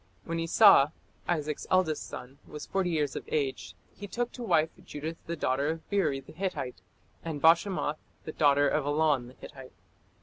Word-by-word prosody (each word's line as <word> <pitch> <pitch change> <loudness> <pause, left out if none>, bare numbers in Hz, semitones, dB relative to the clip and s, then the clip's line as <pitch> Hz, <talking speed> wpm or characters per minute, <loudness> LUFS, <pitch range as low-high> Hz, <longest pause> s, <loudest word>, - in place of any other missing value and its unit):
When 165 0 -3
Esau, 165 -2 +6 0.4
Isaac's 150 -3 -2
eldest 185 -5 +1
son, 130 +3 -9
was 150 - -8
forty 190 -2 -1
years 150 -4 -1
of - - -4
age, 140 -4 -2 0.2
"he 205 - -8
took 240 +5 -3
to 250 - -10
wife 160 -8 +2
Judith 160 -1 -6
the 170 - -2
daughter 140 -2 0
of 160 0 -5
Beeri 160 -9 +1
the - - -15
Hittite, 155 - -4 0.4
and 160 -3 -4
Bashemath 165 -1 +3 0.3
the - - -5
daughter 145 -2 +3
of 150 +1 +1
Elon 145 -4 +2
the 125 - -14
Hittite". 135 -3 -12
155 Hz, 170 wpm, -29 LUFS, 145-170 Hz, 0.4 s, Esau